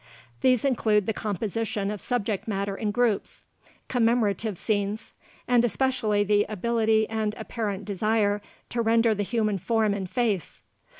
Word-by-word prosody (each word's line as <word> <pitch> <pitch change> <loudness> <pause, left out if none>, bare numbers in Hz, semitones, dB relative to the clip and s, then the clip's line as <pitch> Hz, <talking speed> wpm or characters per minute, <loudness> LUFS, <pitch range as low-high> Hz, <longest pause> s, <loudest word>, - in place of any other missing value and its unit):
These 255 -1 +3
include 215 -6 +2
the 220 - 0
composition 210 0 -2
of 210 - -5
subject 220 -5 -2
matter 200 -1 -2
in 215 +1 -2
groups, 225 -1 0 0.4
commemorative 225 -4 +1
scenes, 205 +1 -2 0.3
and 245 -1 +4
especially 230 -2 +1
the 205 0 +3
ability 220 +1 +1
and 215 -1 -2
apparent 205 -4 -4
desire 210 0 +1 0.3
to 240 - -1
render 230 0 +3
the 205 - -2
human 215 -1 0
form 220 +1 +1
and 190 -2 -4
face. 220 - -1
215 Hz, 135 wpm, -26 LUFS, 205-230 Hz, 0.4 s, and